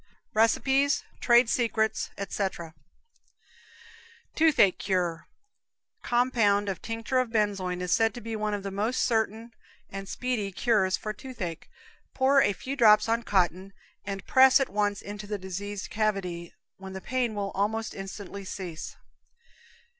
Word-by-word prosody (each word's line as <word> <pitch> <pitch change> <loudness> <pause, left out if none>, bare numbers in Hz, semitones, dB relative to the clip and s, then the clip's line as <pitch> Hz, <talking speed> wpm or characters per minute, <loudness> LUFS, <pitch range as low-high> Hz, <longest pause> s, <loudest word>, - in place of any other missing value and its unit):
RECIPES, 265 +5 +3 0.2
TRADE 240 0 +5
SECRETS 220 -2 0
ETC. 190 -4 -3 1.6
Toothache 310 - +4
Cure. 175 -4 -1 0.7
Compound 210 -5 +2
tinct. 225 +1 -6 0.2
benzoin 200 -5 -1
is 180 - -3
said 225 0 +3
to - - -6
be 225 -1 -5
one 210 -1 -1
of 200 - -6
the 195 - -4
most 215 +6 0
certain 225 0 -1 0.4
and 195 0 -6
speedy 240 -6 -2
cures 195 -2 +2
for 215 - -5
toothache; 210 -9 -7 0.5
pour 270 +1 +4
a 205 - +3
few 265 +7 -5
drops 215 -4 +6
on 230 +1 +1
cotton, 190 -2 0 0.3
and 195 -1 -5
press 265 0 +6
at 270 - 0
once 205 0 -1
into 205 0 -7
the 210 0 -3
diseased 195 +2 -6
cavity, 195 -6 -2 0.2
when 190 0 -9
the 190 - -5
pain 245 +1 -1
will 200 -1 -3
almost 220 +3 -1
instantly 195 0 -7
cease. 185 -4 -6
210 Hz, 130 wpm, -27 LUFS, 195-230 Hz, 1.6 s, drops